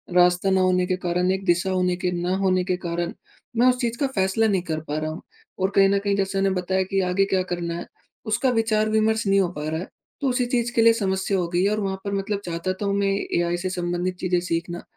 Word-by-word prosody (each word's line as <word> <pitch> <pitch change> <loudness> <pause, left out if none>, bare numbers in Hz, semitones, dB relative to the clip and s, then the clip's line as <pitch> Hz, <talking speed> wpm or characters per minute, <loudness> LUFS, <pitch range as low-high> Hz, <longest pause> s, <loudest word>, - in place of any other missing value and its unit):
रास्ता 180 +1 +4
ना 190 0 +3
होने 180 0 +3
के 185 - +1
कारण, 180 +1 +1
एक 190 0 -2
दिशा 175 +1 +2
होने 180 -1 +1
के 180 - +2
ना 180 +2 0
होने 185 -1 +2
के 180 0 -1
कारण, 170 0 -2 0.4
मैं 245 +2 +5
उस 250 0 +3
चीज़ 235 0 -1
का 280 - +2
फैसला 195 +3 +2
नहीं 195 -4 +1
कर 155 - -1
पा 150 - -2
रहा 155 0 -2
हूँ। 160 - -7 0.4
और 190 +1 +1
कहीं 195 0 +6
न 200 0 +2
कहीं, 200 0 0
जैसे 195 0 0
मैंने 195 -1 +1
बताया 190 +1 0
कि 195 - +3
आगे 195 +2 +3
क्या 185 - +2
करना 170 -1 -3
है, - - -6 0.4
उसका 225 +4 +1
विचार-विमर्श 220 0 +1
नहीं 195 0 +4
हो 185 - +2
पा 150 - -4
रहा 160 +1 -2
है, - - -7 0.3
तो 275 - +1
उसी 250 0 +1
चीज़ 240 -1 0
के 230 - +4
लिए 230 0 +7
समस्या 190 -2 0
हो 180 -2 0
गई 175 +1 +1
है 200 - +3
और 215 - 0
वहाँ 195 -1 -2
पर 200 - -2
मतलब 200 +1 -1
चाहता 170 +2 -2
तो 205 - -2
हूँ 200 - +1
मैं 200 - +1
ये 195 - -2
एआई 175 0 0
से 185 +1 -3
संबंधित 180 0 -2
चीज़ें 180 -1 +1
सीखना, 175 0 -3
190 Hz, 260 wpm, -24 LUFS, 175-200 Hz, 0.4 s, लिए